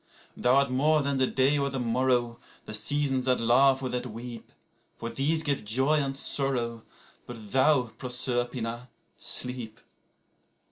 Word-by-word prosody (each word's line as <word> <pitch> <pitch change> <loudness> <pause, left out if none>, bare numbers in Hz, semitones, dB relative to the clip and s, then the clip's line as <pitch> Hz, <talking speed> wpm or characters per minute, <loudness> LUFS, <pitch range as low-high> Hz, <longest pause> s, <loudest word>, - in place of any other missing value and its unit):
3Thou 125 - +2
art 140 -1 +3
more 150 +3 +2
than 140 -1 -1
the 130 -1 +2
day 135 +3 +2
or 140 0 0
the 135 -1 -4
morrow, 120 0 0 0.3
the - - -8
seasons 135 +3 0
that 130 -1 +2
laugh 130 +3 +4
or 130 - -2
that 125 0 -3
weep;4For 115 0 -10
these 155 +4 +1
give 140 -5 -1
joy 130 +8 +2
and 135 -1 -2
sorrow; 120 -5 0 0.5
but 110 -4 -9
thou, 135 +1 +4 0.2
Proserpina, 120 -1 -2 0.3
sleep. 125 -3 -3
130 Hz, 140 wpm, -27 LUFS, 120-135 Hz, 0.5 s, laugh